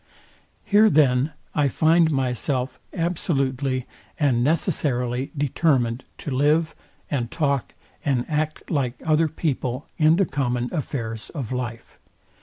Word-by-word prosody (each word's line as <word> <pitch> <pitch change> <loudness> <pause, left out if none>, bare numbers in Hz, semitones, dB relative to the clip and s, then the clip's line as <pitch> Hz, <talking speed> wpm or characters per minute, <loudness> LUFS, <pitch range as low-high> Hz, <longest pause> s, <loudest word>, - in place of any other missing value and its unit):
Here 210 +2 +5
then 140 -2 +3 0.2
I 145 -1 +2
find 160 +4 +4
myself 130 -1 -1
absolutely 135 -7 -1 0.3
and 130 -6 +3
necessarily 135 -4 0
determined 135 -4 +1
to 145 - -6
live, 150 +4 +2 0.4
and 120 -5 -1
talk, 140 -2 -1 0.3
and 130 -4 +1
act 155 0 -2
like 135 -6 0
other 160 0 +3
people 140 -4 -2
in 155 +1 +6
the 195 +2 +3
common 125 -5 -1
affairs 115 -8 -4
of 130 -6 -4
life. 120 -3 -5
140 Hz, 115 wpm, -24 LUFS, 125-155 Hz, 0.4 s, in